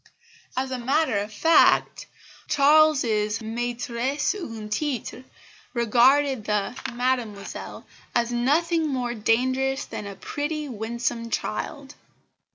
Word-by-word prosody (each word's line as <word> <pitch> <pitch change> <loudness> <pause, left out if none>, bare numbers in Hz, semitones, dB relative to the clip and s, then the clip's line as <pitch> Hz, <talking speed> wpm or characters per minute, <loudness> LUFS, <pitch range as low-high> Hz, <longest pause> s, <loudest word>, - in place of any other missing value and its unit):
As 260 0 -1
a 255 - -3
matter 265 -2 +1
of 205 +2 -5
fact 325 +10 +3 0.4
Charles's 275 -8 +3
maitresse 240 +5 -2
en 225 - -7
titre 255 +1 -3 0.5
regarded 250 +2 +3
the 210 +2 -1 0.2
"Mademoiselle" 240 -4 -3 0.3
as 240 0 +1
nothing 315 +7 +2
more 250 -4 -2
dangerous 260 +5 +1
than 205 - -6
a 200 - -7
pretty, 295 +7 -4
winsome 230 0 -3
child. 105 - -4
245 Hz, 100 wpm, -25 LUFS, 225-280 Hz, 0.5 s, fact